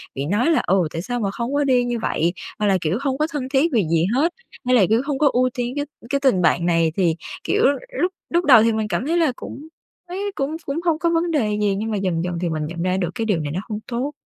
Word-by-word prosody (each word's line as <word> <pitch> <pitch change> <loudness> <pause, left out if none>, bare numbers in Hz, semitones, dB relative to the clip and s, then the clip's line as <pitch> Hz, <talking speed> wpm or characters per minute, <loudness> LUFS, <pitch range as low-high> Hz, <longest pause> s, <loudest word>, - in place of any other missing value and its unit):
bị 135 - -2
nói 210 - +2
là 320 - +3
"Ừ, 185 -3 +3
tại 165 - -3
sao 245 +6 -3
mà 200 -3 -1
không 235 +6 -4
có 290 - +2
đi 255 -3 +3
như 240 -1 -2
vậy?", 170 -5 0 0.3
hoặc 210 - +1
là 195 -1 +3
kiểu: 165 +5 0
"Hông 270 -2 -1
có 305 +2 +1
thân 265 -3 -3
thiết 300 +5 +3
vì 220 -4 +3
gì 165 0 +2
hết", 330 +6 +2 0.3
hay 255 - +3
là 210 -6 +5
kiểu: 225 +2 +3
"Hông 285 -2 -1
có 290 -1 +5
ưu 255 +1 +3
tiên 245 0 -2
cái 290 0 -1 0.2
cái 280 - +1
tình 260 -10 +3
bạn 175 0 +2
này." 165 -2 +2
Thì, 170 -4 +2 0.3
kiểu, - - +1 0.3
lúc 360 - +1 0.2
lúc 345 +1 +1
đầu 250 -6 +8
thì 230 - +3
mình 220 -1 -1
cảm 190 +6 -2
thấy 335 +2 +1
là 320 -6 +3
cũng 295 +5 -9 0.4
thấy 400 +3 -3
cũng 280 +3 -2
cũng 280 +3 -2
hông 330 -2 +2
có 340 - +1
vấn 335 0 +1
đề 215 -9 +1
gì, 205 -2 +2
nhưng 220 +3 -3
mà 210 - 0
dần 180 -4 -1
dần 175 -1 -3
thì 175 - 0
mình 155 -1 -2
nhận 170 +2 -5
ra 185 +1 0
được 180 -3 -1
cái 225 - -2
điều 205 -6 +1
này 145 -2 -3
nó 175 - -2
hông 210 -1 -3
tốt. 255 +3 -2
235 Hz, 285 wpm, -21 LUFS, 185-285 Hz, 0.4 s, đầu